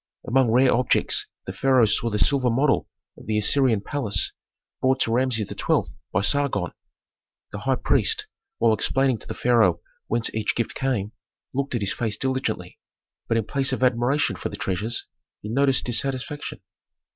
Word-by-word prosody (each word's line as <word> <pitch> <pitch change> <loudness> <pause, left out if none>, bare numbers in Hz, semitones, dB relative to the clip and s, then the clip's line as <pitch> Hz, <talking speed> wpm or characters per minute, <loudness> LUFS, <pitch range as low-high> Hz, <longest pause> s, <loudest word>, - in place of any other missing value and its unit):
Among 130 -1 +3
rare 125 +3 +4
objects 125 +1 +2 0.2
the 95 - -5
pharaoh 130 +3 +4
saw 110 +2 +1
the 105 - -1
silver 130 +2 +2
model 135 +4 +2 0.3
of - - -15
the 110 -1 0
Assyrian 115 0 +3
palace 105 -5 -1 0.5
brought 130 0 +2
to 115 - +2
Rameses 120 -4 +1
XII. - - -1
by 100 - +1
Sargon. 105 -6 +1 0.8
The - - -6
high - - +1
priest, - - +1 0.3
while 115 -1 +3
explaining 130 +1 +1
to - - -13
the - - -5
pharaoh 110 -8 +3 0.3
whence 115 0 0
each 110 -1 -1
gift 120 - -2
came, 115 -7 -2 0.4
looked 140 -1 -2
at 120 - -1
his 100 - -1
face 110 -3 -2
diligently. 130 0 -3 0.5
But 115 - +1
in 110 - 0
place 135 +2 0
of 130 - -2
admiration 125 +4 +2
for - - -4
the - - -7
treasures, 105 +5 -2 0.3
he 105 - -8
noticed 135 +3 +2
dissatisfaction. 135 +4 -3
120 Hz, 165 wpm, -24 LUFS, 110-135 Hz, 0.8 s, rare